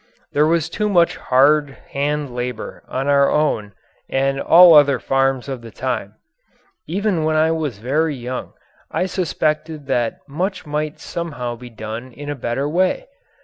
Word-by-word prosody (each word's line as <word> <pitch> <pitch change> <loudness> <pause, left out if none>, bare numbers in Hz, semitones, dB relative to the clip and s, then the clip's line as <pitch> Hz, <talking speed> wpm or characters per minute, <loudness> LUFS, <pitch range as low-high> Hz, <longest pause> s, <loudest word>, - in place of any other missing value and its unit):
There 150 +1 +3
was 165 -1 +2
too 210 +5 -2
much 175 -4 +3
hard 140 +2 +3
hand 145 -1 -1
labour 125 -2 -5
on 135 +2 -3
our 140 -1 +4
own 110 -9 0 0.4
and 135 +1 0
all 175 0 +8
other 145 -3 +6
farms 135 0 0
of 135 -3 -5
the 115 - -10
time. - - -4 0.7
Even 190 -1 0
when 155 0 +1 0.4
very 145 +9 -1
young 125 0 -6 0.4
I - - -1
suspected 155 -4 -2
that 120 -4 0
much 180 +7 -3
might 150 0 -3
somehow 135 -8 -4
be 120 +1 -11
done 115 +2 -7
in 145 +2 -6
a - - -3
better 130 +2 -2
way. 185 - 0
145 Hz, 145 wpm, -20 LUFS, 130-160 Hz, 0.7 s, all